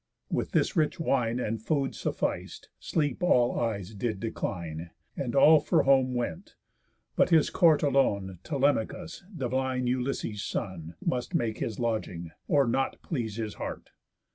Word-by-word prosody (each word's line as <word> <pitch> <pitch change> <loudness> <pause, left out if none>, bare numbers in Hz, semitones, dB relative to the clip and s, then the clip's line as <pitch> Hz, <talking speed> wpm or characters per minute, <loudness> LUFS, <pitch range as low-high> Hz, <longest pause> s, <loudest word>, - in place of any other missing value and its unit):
With - - -1
this - - +2
rich 155 -2 +1
wine 125 -6 +1
And 115 -2 -2
food 135 +3 0
suffic'd, - - -3
sleep 145 -4 -1
all 125 -9 +3
eyes 110 -4 -2
did 105 0 -2
decline, 85 -7 -4 0.3
And 120 - -3
all 155 +3 +8
for 160 +3 +2
home 130 -2 +4
went; 175 +10 -4 0.6
but - - +4
his 160 -3 +4
court 160 -4 +4
alone 100 - +1
Telemachus, 145 +4 -1
divine 130 - -1
Ulysses' 125 -4 -1
son, 85 -6 -4
Must 125 -1 -1
make 110 -2 0
his 110 - -3
lodging, 105 -8 -2 0.2
or 140 -2 +4
not 130 +3 0
please 115 - -3
his 110 -2 -3
heart. - - -6
125 Hz, 140 wpm, -28 LUFS, 110-140 Hz, 0.6 s, all